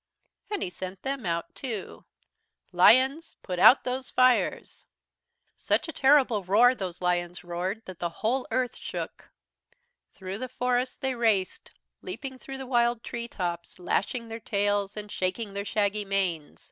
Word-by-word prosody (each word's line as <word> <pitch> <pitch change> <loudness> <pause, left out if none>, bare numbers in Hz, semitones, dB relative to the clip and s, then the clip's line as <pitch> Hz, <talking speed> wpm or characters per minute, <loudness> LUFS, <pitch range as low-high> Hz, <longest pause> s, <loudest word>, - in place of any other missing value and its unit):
"And 415 -1 -2
he 180 - -4
sent 185 +1 -7
them 270 -6 -3
out 170 0 -2
too. 230 -7 -6 0.7
"'Lions, 265 +6 +4
put 180 -2 -4
out 255 - +8
those 255 +1 -3
fires!' 255 -1 +1 0.7
"Such - - 0
a - - -4
terrible 265 -7 +4
roar 220 +7 +5
those 185 -6 -6
lions 175 0 -1
roared 180 +5 -3
that 185 -2 -10
the 170 - -1
whole 225 +10 -1
Earth 250 +1 -1
shook. - - -6 0.9
Through 190 +1 -6
the 255 0 -5
forests 250 0 -1
they 265 -1 -1
raced, 220 -6 0 0.3
leaping 270 -8 -7
through 270 +1 -7
the 265 - -6
wild 240 -2 +1
tree 235 0 -5
tops, 175 -5 -4
lashing 230 +6 -1
their 225 0 -6
tails, 205 -1 0
and 210 0 -6
shaking 195 +3 -2
their 200 0 -4
shaggy 205 0 0
manes. 185 -6 -1
215 Hz, 150 wpm, -27 LUFS, 185-255 Hz, 0.9 s, out